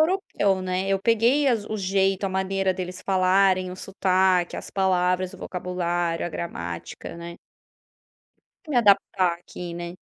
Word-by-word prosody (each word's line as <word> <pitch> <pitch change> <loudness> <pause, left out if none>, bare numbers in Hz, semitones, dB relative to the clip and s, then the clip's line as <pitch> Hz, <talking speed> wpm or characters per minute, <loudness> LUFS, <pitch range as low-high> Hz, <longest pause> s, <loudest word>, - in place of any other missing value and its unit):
europeu, 310 - +1
né, 185 +1 -2
eu 195 0 +2
peguei 230 +7 +3
as 225 -4 +1
o 215 - -3
jeito, 195 0 +1
a - - +1
maneira 190 0 0
deles 185 0 -6
falarem, 185 -1 +3
o 180 - -7
sotaque, 185 -2 +1
as - - -8
palavras, 185 -1 +1
o - - -12
vocabulário, 175 -2 -2
a - - -3
gramática, 85 - -6
né. 170 0 -8 1.3
Me 295 - -3
adaptar 195 -5 +3
aqui 175 -1 -8
né. 175 +1 -6
185 Hz, 145 wpm, -24 LUFS, 180-195 Hz, 1.3 s, peguei